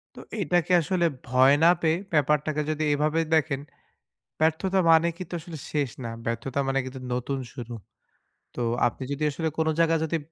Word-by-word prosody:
তো - - -10 0.2
এটাকে 175 0 +1
আসলে 175 +1 0 0.2
ভয় 130 +2 +5
না 170 - +8
পেয়ে 160 0 +2 0.2
ব্যাপারটাকে 150 0 +2
যদি 155 0 -1
এভাবে 150 +2 +1 0.2
দেখেন, 150 -3 +1 0.8
ব্যর্থতা 165 +5 +2
মানে 165 +1 +6
কিন্তু 185 - -8
আসলে 165 0 -9
শেষ 145 -3 0
না, 115 - -4 0.2
ব্যর্থতা 120 +4 -2
মানে 135 0 +1
কিন্তু 130 0 -7
নতুন 125 +2 -2
শুরু। 120 -3 -7 0.8
তো - - -6 0.3
আপনি 120 - -3
যদি 140 - -4
আসলে 160 +3 -2
কোনো 160 0 +2
জায়গায় 165 -1 +3
যদি 165 +1 -1
155 Hz, 165 wpm, -26 LUFS, 135-165 Hz, 0.8 s, না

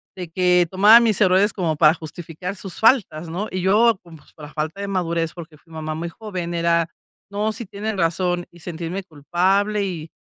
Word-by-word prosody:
De 180 -2 -6
que 180 0 +3
tomaba 205 +5 +7
mis 225 -4 +2
errores 190 +2 +4
como 170 -5 -1
para 155 +1 +5
justificar 170 +3 -7
sus 190 -2 -8
faltas, 195 - +2
¿no?, 185 +6 -3
y 185 - -3
yo 215 +4 +4
como, 170 -2 -13
pues, 150 - -23
por 150 - -11
la 150 - -13
falta 155 +4 -4
de 200 - -4
madurez, 170 -4 -1
porque 165 -3 -11
fui 165 +2 -21
mamá 155 -1 -4
muy 170 +2 -4
joven, 180 -2 -6
era: 170 -1 +1 0.4
"No, 210 +2 -1
si 230 +2 -5
tienen 205 +2 -5
razón", 175 +1 0
y 175 - -17
sentirme 170 +3 -5
culpable 190 +6 0
y, 165 -5 -5
180 Hz, 200 wpm, -21 LUFS, 165-200 Hz, 0.4 s, tomaba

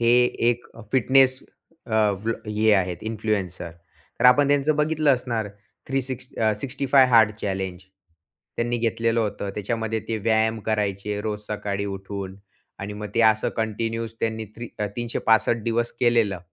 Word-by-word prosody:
हे 115 0 +4 0.4
एक 120 0 -4 0.3
फिटनेस 130 +1 +4 0.5
अ, 110 - -8 0.3
वलॉ 115 -1 -3
हे 110 0 +4
आहेत 90 -2 0
इन्फ्लुएन्सर 105 -6 -3 0.5
तर - - 0
आपण 140 +3 +6
त्यांचं 145 +1 +2
बघितलं 150 -1 +2
असणार 120 -5 0 0.4
थ्री 135 +1 +1
सिक्स 130 0 -6
अ, 110 -1 +3
65 135 -1 +3
हार्ड 110 -2 +7
चॅलेंज. 95 -2 -3 0.7
त्यांनी 120 +1 0
घेतलेलं 115 0 +1
होतं. 100 -2 -3
त्याच्यामध्ये 110 +1 -2
ते 115 - -1
व्यायाम 110 0 +2
करायचे 105 -1 -1
रोज 105 -1 -3
सकाळी 100 -1 -3
उठून 95 -1 -6 0.4
आणि 100 +3 -5
मग 105 0 -6
ते 115 - +3
असं 110 0 -1
कंटिन्यूस 115 +1 -2
त्यांनी 110 0 -1
थ्री 120 0 -7 0.3
365 115 -1 +1
दिवस 120 +1 -1
केलेलं. 115 -5 +2
110 Hz, 140 wpm, -24 LUFS, 105-120 Hz, 0.7 s, हार्ड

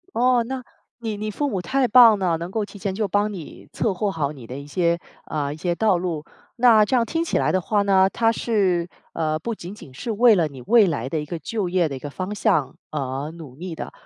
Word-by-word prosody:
哦， 245 0 +3
那， 260 +2 -5 0.4
你 225 -3 -4
你 215 +1 -4
父 290 +7 -1
母 195 -8 -2
太 260 +8 +1
棒 235 -3 +7
了， 180 -4 +1
能 170 +2 -6
够 215 +1 -1
提 205 - -11
前 195 0 -3
就 215 +1 0
帮 205 +1 0
你 175 -6 -10
策划 205 -1 0
好 150 -6 -2
你 135 -5 -12
的 130 +4 -7
一 140 - -9
些， 170 +2 +1 0.3
啊， 145 -2 -3
一 - - -6
些 175 +2 -1
道 210 -1 +2
路。 170 -4 -3 0.3
那 230 -3 +6
这 210 - -1
样 235 -1 +2
听 330 +5 -1
起 - - 0
来 - - +1
的 185 - +2
话 205 +3 +1
呢， 190 -1 +4
他 225 -1 +2
是， 190 -7 0 0.2
呃， 155 -1 -1
不 230 +8 -4
仅 180 -2 -9
仅 170 -10 -13
是 230 - -5
为 225 +1 +5
了 170 -5 +2
你 135 -3 -11
未 225 - +5
来 135 -6 -2
的 155 +2 -2
一 - - -5
个 165 +3 -5
就 205 +2 -3
业 175 -2 +2
的 140 - -5
一 - - -6
个 145 +2 -7
方 185 +7 -4
向 200 - +1 0.2
而 140 0 -3
努 160 -6 -11
力 175 +2 -6
的。 - - -7
185 Hz, 270 characters per minute, -23 LUFS, 160-220 Hz, 0.4 s, 棒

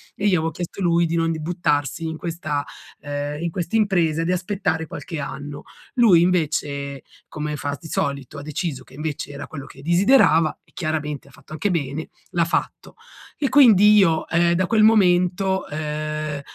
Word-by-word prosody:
e 200 - -8
io 185 -4 +4
avevo 165 +1 -1
chiesto 175 +4 -6
lui 170 -1 +3
di 165 - -1
non 165 0 +1
buttarsi 155 -2 -1
in 160 - -4
questa, 160 -3 -3 0.4
ehm, 145 +1 -4
in 170 - -1
questa 175 +3 -3
impresa, 175 -7 +2
di 175 - 0
aspettare 180 -3 -1
qualche 165 -5 -6
anno. 145 +1 -6 0.3
Lui 220 -9 +6
invece, 145 -5 -1 0.3
come 150 0 -4
fa 145 0 -3
di 165 - -11
solito, 140 0 -3
ha - - -6
deciso 150 -3 -4
che - - -19
invece 150 0 -5
era 140 +1 -7
quello 140 -4 -8
che 135 - -14
desiderava 170 - +4
e - - -30
chiaramente 150 -4 -3
ha 140 - -17
fatto - - -19
anche 205 +6 -1
bene, 155 -2 -3 0.2
l'ha 170 -2 +1
fatto. 165 - -3 0.4
E 280 - +1
quindi 210 -6 +7
io, 165 -6 +3
ehm, 170 +1 +2
da 185 +1 +1
quel 220 -2 +3
momento, 190 -2 +3
ehm, 155 -1 -4
165 Hz, 175 wpm, -22 LUFS, 150-180 Hz, 0.4 s, quindi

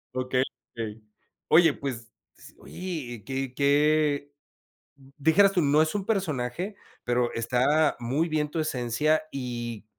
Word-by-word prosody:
Okey, 130 0 +1 0.3
okey. 110 -1 -6 0.4
Oye, 160 -2 +6
pues, 120 -4 -6 0.3
s - - -15
oye, 145 - -6
qué 135 -1 -4
qué 145 +1 +2 0.7
d 135 -1 -20
dijeras 175 +7 +5
tú, 180 - +1
no 150 +1 +4
es 160 - -2
un 205 -2 -2
personaje, 180 - -2 0.3
pero 120 0 +1
está 130 +7 +2
muy 135 +8 0
bien 155 -2 -1
tu 160 - -3
esencia 150 +1 +1
y 120 -4 -5
140 Hz, 130 wpm, -27 LUFS, 125-155 Hz, 0.7 s, Oye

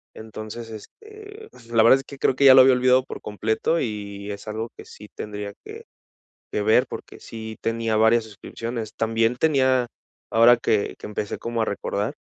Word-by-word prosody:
entonces, 110 +1 -8
este, 430 - -12
pues, 115 - -18
la 115 -1 +4
verdad 130 +4 +6
es - - -9
que 140 - -11
creo 135 - +1
que 140 - 0
ya 130 - +10
lo - - +9
había 130 0 +6
olvidado 125 +1 +3
por - - -8
completo 110 +10 -1
y 100 -4 -5
es 100 - -8
algo 110 +1 -4
que - - -10
sí 105 - -13
tendría 105 -1 -6
que 445 +2 -10 0.7
que 105 - -1
ver 110 +4 +3
porque - - -9
sí 110 -1 -8
tenía 115 -1 -1
varias 110 +2 +4
suscripciones. 110 +1 -7
También 115 +1 +1
tenía 130 -4 +2 0.4
ahora 115 +2 +6
que 105 -3 0
que - - -9
empecé 105 0 -4
como 115 0 -3
a - - +2
recordar 105 +4 -3
115 Hz, 185 wpm, -23 LUFS, 110-130 Hz, 0.7 s, ya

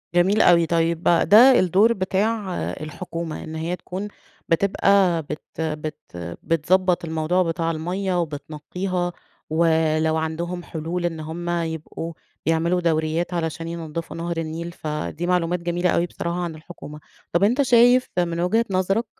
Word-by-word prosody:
جميل 190 +4 +4
أوي. 170 -1 +6
طيب، 165 0 0
بقى 170 - +4
ده 245 +6 +8
الدور 195 +6 +4
بتاع 195 +1 -1 0.3
الحكومة 165 +1 -5
إن 160 - -7
هي 165 +3 -2
تكون 185 +3 -6 0.4
بتبقى 190 0 +3
بت 150 +1 -6 0.2
بت 155 -1 -3 0.5
بتضبط 175 +3 +2
الموضوع 160 +3 +1
بتاع 165 -1 -1
المَيَّة 180 +3 -2
وبتنقيها، 175 +4 -3 0.4
ولو 160 -1 +2
عندهم 170 +3 -3
حلول 170 +2 -4
إن 165 -2 -2
هم 165 +3 -5
يبقوا 165 -1 -3 0.3
يعملوا 165 +2 +1
دوريات 165 +1 0
علشان 165 -1 -3
ينضفوا 165 -1 -5
نهر 170 0 -3
النيل، 165 +1 -4
فدي 150 - -4
معلومات 180 -1 +1
جميلة 175 +1 0
أوي 170 - +2
بصراحة 170 0 -4
عن 170 -2 -3
الحكومة. 155 -1 -10 0.3
طيب، 170 +3 +3
أنت 240 +7 +3
شايف 245 0 +5
من 170 -1 0
وجهة 220 +7 +2
نظرك، 195 +4 +1
170 Hz, 140 wpm, -23 LUFS, 160-180 Hz, 0.5 s, ده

